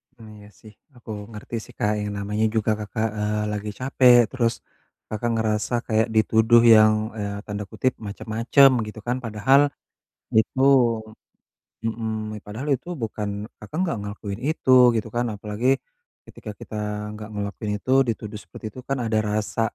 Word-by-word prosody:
Mmm, 110 -2 -13
iya 105 0 -14
sih 110 -1 -14 0.2
aku 120 -1 -16 0.2
ngerti 105 +2 -7
sih - - -16
Kak 105 - +1
yang 105 0 -3
namanya 105 +2 -1
juga 110 0 +2
Kakak, 110 +1 -2
eee, 105 0 -1
lagi 105 0 -4
capek 130 -1 +5
terus 120 -3 +1 0.6
Kakak 110 +2 -2
ngerasa 110 0 -1
kayak 110 -1 +2
dituduh 110 +2 +5
yang, 110 0 +6 0.2
eee, 100 -1 -3
tanda 105 0 -4
kutip 130 0 0
macem-macem 115 +7 +3 0.2
gitu 105 +1 -8
kan, 125 +1 0
padahal 115 +5 +3 0.8
itu 110 +4 +2 1.3
mhm, 115 0 -3 0.4
padahal 110 +8 -6
itu 155 - -14
bukan, 110 -2 -3 0.3
Kakak 105 +9 -8
enggak 175 -11 -1
ngelakuin 100 0 -6
itu 155 -4 0 0.2
gitu 110 0 -1
kan, 120 +1 +1
apalagi 105 +4 -3 0.6
ketika 105 - -9
kita - - -9 0.4
nggak 105 0 -8
ngelakuin 105 +1 -4
itu, 130 - -4 0.2
dituduh 110 -2 -4
seperti 90 - -11
itu 130 - -11
kan 135 - 0
ada 110 -1 0
rasa, 105 +2 -1
110 Hz, 150 wpm, -24 LUFS, 105-120 Hz, 1.3 s, yang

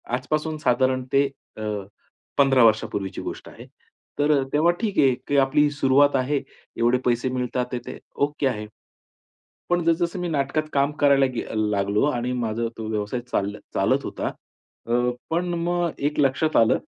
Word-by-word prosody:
आजपासून 155 +4 -2
साधारण 130 -1 +1
ते 140 +1 +5 0.3
अ, - - -7 0.8
15 135 -3 +5
वर्षांपूर्वीची 105 -3 0
गोष्ट - - -7
आहे. - - -12 0.5
तर 145 +1 +3
अ, - - 0
तेव्हा 160 +4 +4
ठीक 210 -4 -2
आहे, 135 -2 +5
की 145 - +1
आपली 140 +2 +4
सुरुवात 145 0 +3
आहे 135 +2 +1 0.4
एवढे 120 +2 +3
पैसे 125 +1 +1
मिळतात 125 0 -1
आहेत 120 - -2
ते 130 - -6 0.3
ओके 145 -1 -2
आहे. 105 -4 -3 1.0
पण 175 0 +2
जसं-जसं 170 +2 +1
मी 175 - -2
नाटकात 150 0 0
काम 140 +1 +2
करायला 140 -1 +5
गे - - -2
अ, - - -8
लागलो 105 +1 +1
आणि 125 -1 -2
माझा 115 -2 -1
तो 110 -1 -5
व्यवसाय 105 +3 -2
चाल 100 +1 -1 0.2
चालत - - +1
होता. - - -3 0.6
अ, 115 - -3 0.4
पण 175 +2 0
मग 175 0 0
एक 145 +1 0
लक्षात 140 +3 +1
आलं. 115 -1 +4
135 Hz, 165 wpm, -24 LUFS, 120-150 Hz, 1.0 s, ते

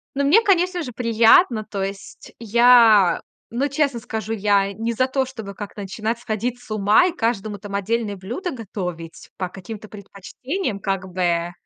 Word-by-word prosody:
Но 280 - 0
мне, 345 +11 +6
конечно 365 -3 +2
же, 250 - -6
приятно. 230 +2 +4
То 205 -2 -4
есть, 195 0 -8
я, 230 -4 +5 0.3
ну 255 +5 -1
честно 280 -3 0
скажу, 220 -1 -5
я 200 -2 +1
не 225 +3 -3
за 255 +3 +1
то, 265 0 0
чтобы 220 -6 -8
как-то 205 0 -8
начинать 215 +4 -3
сходить 235 +2 -3
с 245 - -18
ума 215 - +4
и 360 - -3
каждому 220 - -2
там 200 +1 -7
отдельное 205 +1 -2
блюдо 245 - -5
готовить 180 - -7
по 185 - -2
каким-то 210 +3 -9
предпочтениям, 210 - -6
как 195 -1 -3
бы. 175 -1 0
220 Hz, 165 wpm, -21 LUFS, 200-245 Hz, 0.3 s, мне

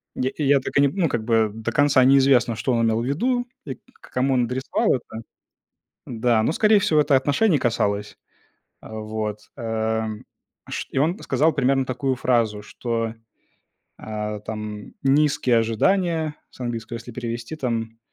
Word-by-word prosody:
Я 130 - 0
и 150 - -3
я 140 0 +5
так - - -6
и 145 - +6
не, 140 - +5
ну, 165 +1 0
как 115 - -2
бы, 110 -2 +2
до 110 0 -4
конца 145 -3 +4
неизвестно, 130 -3 +4
что 130 - -1
он 115 -1 +2
имел 110 0 +1
в - - -3
виду, 245 - 0 0.2
и - - -5
к - - -32 0.2
к - - -17
кому 130 +2 +1
он 125 -1 +2
адресовал 130 +3 0
это. 115 -3 -7 0.8
Да, 115 -2 +1
но, - - +1
скорей 215 +5 +4
всего, 155 -5 +2
это 145 -1 +3
отношений 150 +7 +3
касалось. 105 -5 -1 0.7
А, 110 - -11
вот, 110 -1 -4 0.2
э, 110 -1 -1 0.7
шт - - -5
и - - 0
он 165 +7 +1
сказал 160 +2 +1
примерно 135 -1 +2
такую 130 +1 -1
фразу, 115 -4 +1
что, 115 +1 -3 0.8
э, 105 -1 -4
там, 105 -1 -6
низкие 135 -3 +3
ожидания, 160 - +1
с - - -20
английского 120 -1 -4
если 115 +1 -10
перевести, 120 +3 -5
там, 115 -5 -3
125 Hz, 170 wpm, -23 LUFS, 110-140 Hz, 0.8 s, и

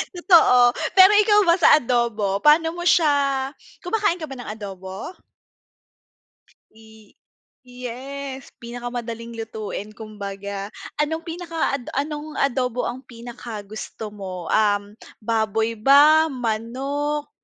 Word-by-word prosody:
totoo. 340 -9 +5 0.4
Pero 380 +2 +9
ikaw 420 -1 +4
ba 335 - +6
sa - - +7
adobo, 230 -6 0
paano 325 +2 +5
mo 350 - -5
siya 280 -6 +2 0.3
kumakain 385 -1 0
ka 310 - -4
ba 270 - -7
ng 245 - -8
adobo? 195 - -8 1.6
Pi 220 -1 -19 0.5
yes, 260 +2 -8
pinakamadaling 235 -1 -6
lutuin 220 -2 -6
kumbaga. 200 -2 -6 0.3
Anong 320 +3 -2
pinaka 330 -3 -3
ad 250 - -7 0.2
anong 300 +1 -6
adobo 250 -2 0
ang 250 +2 -5
pinakagusto 220 -3 -8
mo, 185 -4 -7
um, 205 -2 +3 0.3
baboy 220 0 -1
ba, 290 +7 +5
manok? 270 +5 -3
245 Hz, 105 wpm, -22 LUFS, 220-295 Hz, 1.6 s, Pero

